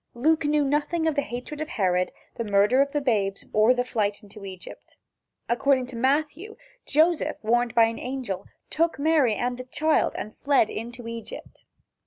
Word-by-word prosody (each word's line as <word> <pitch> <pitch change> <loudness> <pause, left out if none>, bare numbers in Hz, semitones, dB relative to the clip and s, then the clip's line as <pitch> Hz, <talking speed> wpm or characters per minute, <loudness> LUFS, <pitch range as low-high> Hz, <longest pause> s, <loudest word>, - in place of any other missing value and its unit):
Luke 315 +5 +2
knew 295 0 +2
nothing 295 +4 0
of 320 - +2
the 285 - +1
hatred 265 +4 -6
of 310 - -4
Herod, 180 -2 0 0.2
the 230 - -4
murder 210 +5 +3
of 280 0 +1
the 295 - -1
babes 205 -7 0
or 215 +3 +5
the 245 -1 +1
flight 210 -3 -2
into 205 0 -13
Egypt. 185 -2 -11 0.5
According 255 +2 +2
to - - -6
Matthew, 300 - -1 0.3
Joseph, 320 +2 +2
warned 240 +1 +1
by 230 - +7
an 225 0 0
angel, 250 -7 -5 0.2
took 330 -1 +1
Mary 285 -6 +3
and 245 +2 -2
the - - -4
child 305 +5 +1
and 215 - -6
fled 275 -6 +2
into 240 +1 -7
Egypt. 230 - -9
250 Hz, 175 wpm, -25 LUFS, 225-295 Hz, 0.5 s, by